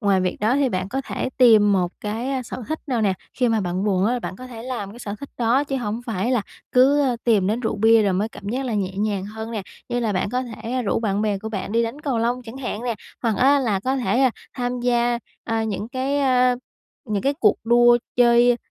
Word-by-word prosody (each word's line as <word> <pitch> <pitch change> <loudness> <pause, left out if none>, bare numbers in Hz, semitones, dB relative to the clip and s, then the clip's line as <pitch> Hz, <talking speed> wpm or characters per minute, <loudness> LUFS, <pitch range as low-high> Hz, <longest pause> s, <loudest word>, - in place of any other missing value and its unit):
ngoài 200 -4 +3
việc 180 -1 -1
đó 220 +5 +2
thì 280 -2 +2
bạn 185 -4 -2
có 265 +5 -2
thể - - -3
tìm 220 -5 +6
một 180 -2 +1
cái, 225 +5 -3
a, 265 -2 -1
sở 245 +1 -7
thích 315 - -3
nào 245 -4 0
nè. 200 -3 +3 0.2
Khi 250 -2 +1
mà 225 -2 +2
bạn 185 +1 -2
buồn 195 -1 +2
á, 245 +2 +1
bạn 185 - -6
có 255 - -9
thể 230 -2 -9
làm 240 -6 -4
cái 235 - -12
sở 205 -4 -5
thích 280 - -8
đó 245 +4 +2
chứ 270 -1 -2
hổng 225 -2 -3
phải 220 0 -1
là 240 - +2 0.3
cứ, 270 +3 +5
ơ, 255 -3 +1
tìm 210 -6 +3
đến 220 +4 0
rượu 220 - -2
bia 225 +1 +5
rồi 200 -2 +2
mới 200 +4 0
cảm 200 -3 -9
giác 260 +4 -2
là 235 - -2
nhẹ 195 -2 -2
nhàng 205 -2 -1
hơn 220 +2 -7
nè. 215 -4 -3 0.3
Như 245 0 -1
là 220 -3 0
bạn 185 +2 -1
có 250 +2 0
thể 245 +1 -4
rủ 205 - 0
bạn 210 -2 0
bè 205 -2 0
của 220 +3 -6
bạn 200 -1 -4
đi 230 0 +3
đánh 230 +6 -4
cầu 275 -6 -1
lông 240 +2 0
chẳng 235 +1 -10
hạn 245 -4 -4
nè, 235 - -1 0.3
hoặc 225 -4 +1
á 280 +3 +5
là 215 -7 0
có 260 +5 0
thể, 240 0 +1
a, 260 - +5 0.2
tham 245 -1 -2
gia, 240 -1 +1 0.3
à, 225 -1 -1
những 210 0 -3
cái, 265 +3 -1
a, 255 -2 +3 0.5
những 210 -3 -1
cái 280 +1 +1
cuộc 420 - +4
đua 240 +1 +5 0.2
chơi 240 0 +5
235 Hz, 260 wpm, -22 LUFS, 210-250 Hz, 0.5 s, tìm